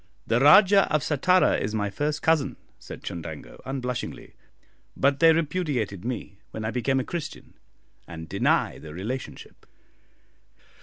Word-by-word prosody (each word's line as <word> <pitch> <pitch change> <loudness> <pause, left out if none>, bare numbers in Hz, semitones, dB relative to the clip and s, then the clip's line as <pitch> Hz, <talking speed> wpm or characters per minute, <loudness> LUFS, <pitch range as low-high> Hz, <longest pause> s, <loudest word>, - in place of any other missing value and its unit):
"The 115 +2 +2
Rajah 195 +8 +6
of 150 -3 +1
Sattara 180 +5 +3
is 105 +2 -2
my 105 -2 -1
first 145 +7 -2
cousin," 145 -5 +2 0.2
said - - -10
Chundango, 80 -3 -8
unblushingly; 125 -2 -5 0.6
"but 140 0 +2
they 165 +1 +7
repudiated 150 - -1
me 115 -5 -5
when 110 - -6
I 110 - -1
became 135 +2 0
a - - -1
Christian, 165 +2 -7 0.5
and 80 -2 -8
deny - - +1
the 75 0 -10
relationship." 115 +9 -7
130 Hz, 135 wpm, -25 LUFS, 105-150 Hz, 0.6 s, they